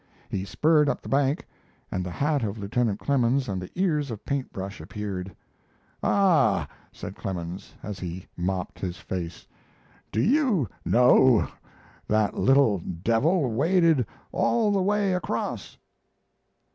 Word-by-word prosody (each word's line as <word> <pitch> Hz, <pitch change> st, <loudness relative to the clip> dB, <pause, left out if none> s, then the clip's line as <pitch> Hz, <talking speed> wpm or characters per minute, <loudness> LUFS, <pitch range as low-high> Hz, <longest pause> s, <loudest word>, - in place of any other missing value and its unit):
He 95 Hz, -1 st, -3 dB
spurred 150 Hz, -, +3 dB
up -, -, -2 dB
the -, -, -8 dB
bank, 140 Hz, +2 st, +1 dB, 0.5 s
and 90 Hz, -, -1 dB
the 90 Hz, -, -4 dB
hat 145 Hz, -, 0 dB
of 105 Hz, 0 st, -3 dB
Lieutenant 105 Hz, +1 st, -1 dB
Clemens 130 Hz, -1 st, +1 dB
and 95 Hz, -4 st, -3 dB
the 90 Hz, -, -7 dB
ears 155 Hz, -6 st, +1 dB
of 110 Hz, -3 st, -7 dB
Paint 140 Hz, -2 st, -2 dB
Brush 95 Hz, +2 st, -6 dB
appeared. 100 Hz, -3 st, -5 dB, 0.7 s
"Ah," 165 Hz, -, +3 dB, 0.2 s
said -, -, -8 dB
Clemens, 90 Hz, -1 st, -6 dB
as 105 Hz, -3 st, -5 dB
he 90 Hz, 0 st, -6 dB
mopped 90 Hz, +1 st, -3 dB
his 90 Hz, -1 st, -4 dB
face, 90 Hz, -4 st, -5 dB, 0.7 s
"do -, -, -1 dB
you 230 Hz, -, +3 dB, 0.2 s
know 125 Hz, -1 st, +5 dB, 0.6 s
that 110 Hz, -1 st, +2 dB
little 135 Hz, -7 st, +4 dB
devil 115 Hz, -, +1 dB
waded 160 Hz, -, +3 dB, 0.2 s
all 225 Hz, -3 st, +2 dB
the 200 Hz, -1 st, +2 dB
way 200 Hz, 0 st, +2 dB
across?" 180 Hz, -, -3 dB
120 Hz, 135 wpm, -26 LUFS, 95-150 Hz, 0.7 s, know